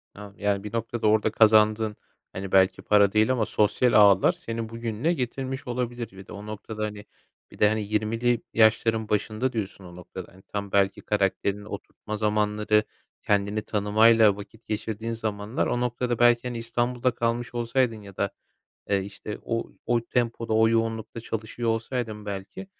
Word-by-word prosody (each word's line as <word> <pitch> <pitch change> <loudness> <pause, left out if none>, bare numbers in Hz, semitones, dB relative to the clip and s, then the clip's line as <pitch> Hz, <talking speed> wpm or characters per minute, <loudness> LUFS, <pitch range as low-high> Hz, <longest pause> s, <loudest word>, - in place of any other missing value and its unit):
Anladım. 100 0 -11
Yani, 100 -1 0
bir 105 - -7
noktada 115 -1 -1
orada 110 0 +3
kazandığın, 110 0 +4 0.4
hani, 95 0 -5
belki, 95 0 +4
para 100 -1 +4
değil 110 +3 +3
ama 120 -4 +1
sosyal 110 +5 +2
ağlar 100 -3 +6
seni 115 -1 -5
bugününe 115 +7 -1
getirmiş 135 0 -4
olabilir. 120 -2 -3
Bir 95 0 -13
de - - -10
o 105 0 -8
noktada, 105 +1 -6
hani, 105 -1 -7 0.5
bir - - -15
de, 105 - +6
hani, 110 0 -1
20'li 110 +3 0
yaşların 110 0 +3
başında 110 +4 -1
diyorsun 100 -3 -4
o 90 -1 -11
noktada. 90 0 -10
Hani, 95 - -17
tam, 100 -1 -5
belki, 100 -1 +2
karakterini 100 0 -1
oturtma 105 +1 -7
zamanları, 105 0 +1 0.4
kendini 100 +1 +1
tanımayla 110 +1 +4
vakit 110 +2 -12
geçirdiğin 110 +1 -3
zamanlar 110 0 -2
o 120 - 0
noktada, 125 -1 -1
belki, 120 0 +4
hani, 120 -1 -4
İstanbul'da 120 +2 0
kalmış 120 +1 -2
olsaydın 120 -1 0
ya 100 -2 -13
da, 100 - 0 0.6
eee, 100 -1 +2
işte, 100 +2 -7
o 115 0 -3
o 120 0 +2
tempoda, 115 -2 -1
o 110 0 +5
yoğunlukta 115 0 -1
çalışıyor 115 +1 -4
olsaydın, 115 -2 -2
belki, 100 - -6
110 Hz, 160 wpm, -26 LUFS, 105-115 Hz, 0.6 s, ağlar